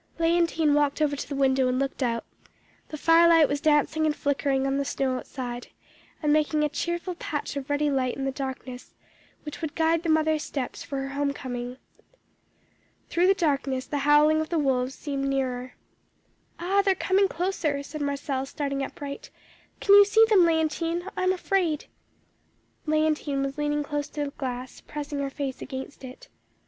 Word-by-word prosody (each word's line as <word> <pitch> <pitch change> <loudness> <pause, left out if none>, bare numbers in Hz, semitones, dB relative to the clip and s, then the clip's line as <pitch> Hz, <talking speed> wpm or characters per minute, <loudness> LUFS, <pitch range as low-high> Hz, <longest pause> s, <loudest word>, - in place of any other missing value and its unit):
"Léontine 330 -2 +2
walked 290 0 +2
over 295 -2 +1
to - - -6
the 285 - -3
window 265 -1 +3
and 255 0 0
looked 275 +1 -2
out; 230 -2 -1 0.6
the 305 - -7
fire 330 +2 +5
light 325 -3 +6
was 285 0 -2
dancing 310 0 +2
and 300 - 0
flickering 275 -2 0
on 270 0 0
the 280 - 0
snow 270 -1 -1
outside, 245 -2 -6 0.6
and 295 -1 +3
making 305 0 +2
a 300 - +1
cheerful 345 +4 -3
patch 295 -4 -4
of 280 -1 -5
ruddy 290 0 +1
light 255 -2 0
in 270 - -3
the 270 - 0
darkness, 260 -2 -7 0.5
which 300 +2 -8
would 315 -2 -4
guide 325 0 +2
the 335 - -3
mother's 315 -1 +2
steps 270 -4 -4
for 275 - -5
her 270 - -5
home 280 0 -1
coming. 245 -2 -5 1.3
Through 350 +2 +3
the 390 - +5
darkness 275 -6 0
the 290 - -3
howling 295 +2 +5
of 315 - -4
the 340 - 0
wolves 265 -3 0
seemed 275 -2 -3
nearer. 255 -2 -2 0.8
"'Ah, 380 +4 +2
they 395 -1 +3
are - - -10
coming 390 +2 +2
closer,' 325 -6 -1
said 305 +1 -7
Marcelle, 280 -1 -2
starting 275 -1 -3
upright. 280 +1 -6 0.5
'Can 400 - +4
you 405 0 +10
see 440 +2 +5
them, 420 -3 +6
Léontine? 330 +3 0
I - - -2
am 370 0 +3
afraid.' 360 -4 0 1.0
"Léontine 305 -2 +1
was 275 +2 -5
leaning 295 0 0
close 290 0 -3
to 295 0 -3
the 280 - -5
glass, 255 -2 -6
pressing 295 -1 -5
her 280 -1 -1
face 275 -1 -5
against 265 0 -7
it. 255 +1 -10
290 Hz, 180 wpm, -26 LUFS, 275-320 Hz, 1.3 s, you